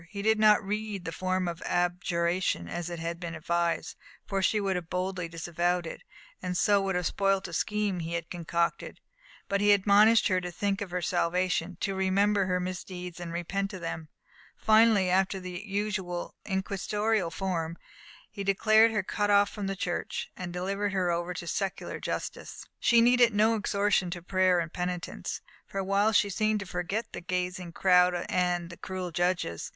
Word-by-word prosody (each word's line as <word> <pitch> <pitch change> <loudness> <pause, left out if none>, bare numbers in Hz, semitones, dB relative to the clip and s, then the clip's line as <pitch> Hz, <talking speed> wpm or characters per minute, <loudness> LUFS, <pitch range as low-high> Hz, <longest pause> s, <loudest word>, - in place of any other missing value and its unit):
He 200 -1 -6
did 220 0 +3
not 215 -1 +5
read 210 -2 -3
the 165 - -3
form 185 +1 -1
of 170 -1 -4
abjuration, 175 - 0
as 175 - -4
had 170 0 -4
been 170 -1 -5
advised, 170 +2 -1 0.3
for 195 -1 -1
she 210 +3 +2
would 195 -2 0
have 175 -2 -4
boldly 180 -1 -2
disavowed 175 +1 -1
it, 160 - -7 0.4
and 180 -1 -2
would - - -2
so 200 0 +3
have 180 -2 0
spoilt 195 0 +1
a 170 - -10
scheme 210 0 -1
he 165 0 -4
had 165 -1 -5
concocted. 170 -1 -2 0.5
But 200 0 0
he 205 0 +6
admonished 205 +3 +5
her 185 -2 +1
to 180 - -4
think 200 +3 -1
of 200 - -4
her 180 0 -3
salvation, 180 0 0
to 195 - 0
remember 195 +1 +2
her 180 -1 +1
misdeeds, 180 -1 -6
and 175 -1 -6
repent 195 +4 -2
of 185 - -7
them. 165 -1 -5 0.5
Finally, 220 -3 +5
after 190 +1 +2
the 180 0 -6
usual 195 -4 -3
inquisitorial 205 0 -1
form, 170 -2 -3 0.5
he 200 -2 -5
declared 215 +3 +5
her 210 -3 -1
cut 205 +2 -1
off 205 0 +4
from 205 -2 -4
the 195 - -2
Church, 175 -2 -3
and 180 -1 -6
delivered 195 +3 -2
over 175 -1 0
to 170 - -6
secular 195 +3 -3
justice. - - -5
She 235 -1 +5
needed 240 -2 +5
no 215 +2 +4
exhortation 205 -3 +1
to 175 -1 -6
prayer 185 -1 +3
and 165 -1 -4
penitence. 180 -1 -4 0.3
For - - -8
a 195 - 0
while 200 +3 +2
she 205 -1 +3
seemed 215 +2 +1
to - - -5
forget 190 +5 -3
the - - -6
gazing 180 -1 -3
crowd 180 -1 +4
and 180 -1 0
the 170 - -10
cruel 185 -2 -5
judges. 175 - -1
185 Hz, 175 wpm, -29 LUFS, 175-200 Hz, 0.5 s, he